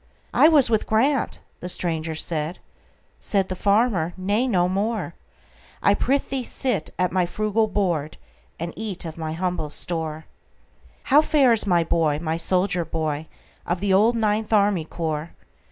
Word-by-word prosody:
"I - - +6
was 300 -5 +5
with 220 -2 0
Grant"—the 230 -6 -1
stranger 165 -3 -1
said; 160 +1 -2 0.6
Said 195 -2 0
the 185 - -3
farmer, 200 -4 +1
"Nay, 205 +7 0
no 180 -7 +2
more,—I 200 -1 -3
prithee 270 -1 0
sit 235 -8 -2
at 180 -1 +1
my 180 -1 +1
frugal 215 +3 0
board, 175 -7 -1 0.4
And 170 +1 -4
eat 210 -6 -5
of 160 - -6
my 160 -1 -4
humble 180 -2 -2
store."How 160 - -2
fares 260 -9 +3
my 175 -3 +3
boy,—my 160 0 0
soldier 180 +1 +1
boy, 155 -1 -3 0.4
Of 175 +1 -2
the 200 0 +1
old 220 +5 +4
Ninth 220 -1 0
Army 200 -6 +3
Corps? 160 -1 -4
185 Hz, 135 wpm, -23 LUFS, 165-220 Hz, 0.6 s, I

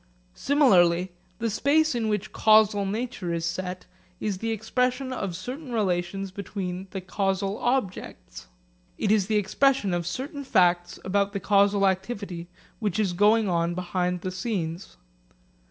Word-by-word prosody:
Similarly 185 - +3 0.3
the 230 +2 -1
space 310 +7 +2
in 230 -2 -1
which 210 0 -2
causal 215 -2 +4
nature 220 -3 -3
is 165 -1 -2
set 180 +1 -4 0.3
is 200 -3 -2
the 225 - -2
expression 250 +4 -1
of 195 -8 -3
certain 250 - -7
relations 195 -2 -1
between 190 -1 -5
the 190 0 -5
causal 195 +2 -1
objects. 205 - -3 0.5
It 210 - 0
is 210 -3 +3
the 215 - 0
expression 210 +1 +2
of 175 -1 -2
certain 280 - -4
facts 175 -7 +2
about 200 +1 +1
the 200 - -2
causal 200 0 +3
activity 190 -3 -3 0.3
which 210 -5 -1
is 200 -5 +1
going 210 +4 +4
on 170 -1 0
behind 180 0 -2
the 185 - -3
scenes. 185 - -4
195 Hz, 140 wpm, -26 LUFS, 180-225 Hz, 0.5 s, causal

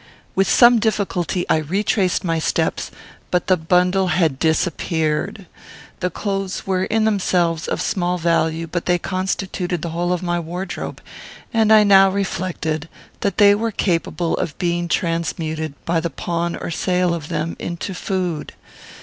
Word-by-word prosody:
With 195 0 +2
some 240 -1 +6
difficulty 195 -5 -1
I - - +3
retraced 185 +4 0
my 165 -2 0
steps, - - -1 0.4
but 180 - +1
the 185 - +4
bundle 180 +3 +2
had 165 -7 +1
disappeared. 160 +3 0 0.5
The 180 - 0
clothes 195 +1 -3
were, 190 -1 0
in 220 0 +1
themselves, 180 -6 +1
of - - -2
small 180 -1 0
value, 165 -1 +1
but 170 +1 -4
they 180 0 +3
constituted 185 -1 -2
the 170 - -2
whole 175 +2 -1
of 180 0 -1
my 175 -1 0
wardrobe; 175 +3 -5 0.5
and 220 -1 +3
I 215 -1 +8
now 195 -1 +7
reflected 175 -5 -2 0.3
that 200 -3 -1
they 205 -1 +7
were 225 +3 0
capable 170 -3 0
of 155 - -3
being 175 -1 -1
transmuted, 160 -3 -2
by 170 0 +1
the 170 +1 -2
pawn 170 +1 -2
or - - -5
sale 180 +1 +1
of 160 -4 -5
them, 160 +2 -2
into 175 +3 -4
food. 180 -4 -3
180 Hz, 150 wpm, -20 LUFS, 165-195 Hz, 0.5 s, I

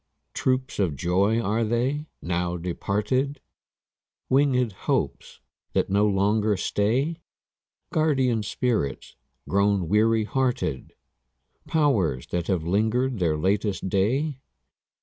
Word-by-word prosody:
Troops 130 -2 -1
of 90 -7 +1
joys 100 - +1
are 110 +3 +1
they, 125 +7 -1 0.2
now 90 0 -1
departed? 105 - -1 0.9
Winged 130 -3 +3 0.2
hopes - - -1 0.3
that - - 0
no 100 +2 +3
longer 105 +1 +2
stay? 125 - 0 0.8
Guardian 130 -7 +2
spirits 105 - -2 0.3
grown 100 -2 +2
weary 110 +3 +3
hearted? 120 - -1 0.7
Powers 105 - +1
that 85 -1 -2
have 90 -5 0
linger'd 110 +7 +1
their 80 -4 +1
latest 95 +3 0
day? 130 - 0
105 Hz, 100 wpm, -25 LUFS, 95-130 Hz, 0.9 s, Winged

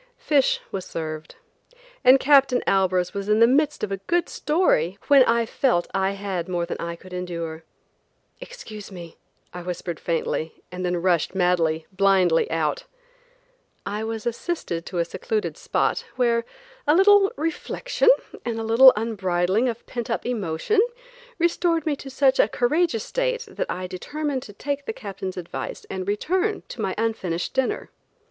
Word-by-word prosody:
Fish 285 -4 +2
was 190 - -3
served, 155 -1 -6 0.7
and 260 +1 +7
Captain 270 -3 +4
Albers 185 -2 +2
was 200 0 -4
in 210 +1 +4
the 230 - +8
midst 285 +3 +2
of 205 - -2
a 195 - -1
good 345 0 +1
story 250 - +1
when 280 -2 +8
I 230 0 +2
felt 235 -7 +1
I 195 0 +1
had 195 -3 -4
more 175 -1 -1
than 170 - -5
I 170 0 -4
could 185 +2 -14
endure. 170 -3 -5 0.8
"Excuse 215 - -10
me," 170 -3 -10 0.4
I 180 - -6
whispered 175 -2 -5
faintly, 165 -1 -2
and 180 0 -5
then 180 0 0
rushed, 180 0 +1
madly, 170 -3 +1
blindly 190 -3 +3
out. 160 -2 -1 1.0
I 210 +1 -3
was 225 -1 -4
assisted 235 - -3
to 180 - -5
a 170 - +2
secluded 445 - -3
spot - - 0
where 235 -2 +2 0.4
a 300 - +5
little 395 +1 +6
reflection 330 - 0 0.3
and 230 -2 -3
a - - -3
little 235 +4 +8
unbridling 200 0 0
of 235 0 -6
pent 240 -2 -5
up 230 - -2
emotion 225 - 0 0.6
restored 335 -1 +1
me 305 -2 +1
to 270 - -9
such 265 0 +2
a - - +6
courageous 245 +1 +1
state - - -1
that 410 - -4
I 185 +1 -3
determined 280 +10 -3
to - - -10
take 285 +5 -4
the - - -2
Captain's 195 - -6
advice 175 -2 -6
and 190 0 -4
return 370 - 0
to - - -6
my - - -1
unfinished 190 -7 -2
dinner. 265 -1 -1
215 Hz, 160 wpm, -24 LUFS, 180-280 Hz, 1.0 s, the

